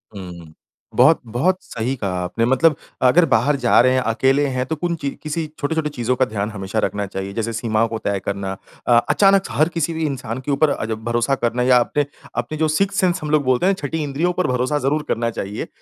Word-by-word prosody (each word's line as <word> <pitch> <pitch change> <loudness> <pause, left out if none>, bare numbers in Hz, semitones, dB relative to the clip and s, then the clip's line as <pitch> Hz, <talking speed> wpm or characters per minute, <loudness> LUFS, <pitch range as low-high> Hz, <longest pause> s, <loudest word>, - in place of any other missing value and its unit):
हुँ। 85 -4 -9 0.4
बहुत 160 - +5
बहुत 130 +12 +1
सही 125 +3 -3
कहा 100 -7 -3
आपने 115 +6 -1
मतलब 135 +5 +3 0.3
अगर 170 +6 +5
बाहर 140 +7 +3
जा 125 -3 +3
रहे 130 +1 +4
हैं 130 - +3
अकेले 135 +5 +2
हैं 130 0 -1
तो 160 - -2
कुन 170 +2 -2
चीज़ 140 - -2
किसी 155 +1 -2
छोटे-छोटे 155 +1 -1
चीज़ों 125 -3 -1
का 130 - +2
ध्यान 105 -3 -3
हमेशा 100 +1 -3
रखना 105 0 -3
चाहिए। 95 0 -6
जैसे 115 +1 -2
सीमाओं 110 0 0
को 115 - -4
तय 100 -2 -1
करना 100 -1 -3 0.4
अ, - - +2 0.2
अचानक 195 -1 +4
हर 155 +3 +2
किसी 165 0 0
भी 160 0 -2
इंसान 130 -5 -4
के 145 - -1
ऊपर 145 +2 +3
अ, 125 - -2
भरोसा 120 +4 0
करना 120 -1 -1
या 125 0 +5
अपने 145 +4 0 0.3
अपने 120 +6 -2
जो 160 +1 +2
सिक्स्थ 195 +6 0
सेंस 185 -1 +2
हम 150 - -3
लोग 155 -1 +3
बोलते 130 +4 +2
हैं 195 - +4
ना 150 -7 -4
छठी 160 +2 -3
इंद्रियों 150 +5 -1
पर 185 - +2
भरोसा 125 +3 0
ज़रूर 145 +3 0
करना 115 0 0
चाहिए। 105 -2 -5
अ, - - -9
130 Hz, 230 wpm, -20 LUFS, 115-155 Hz, 0.4 s, बहुत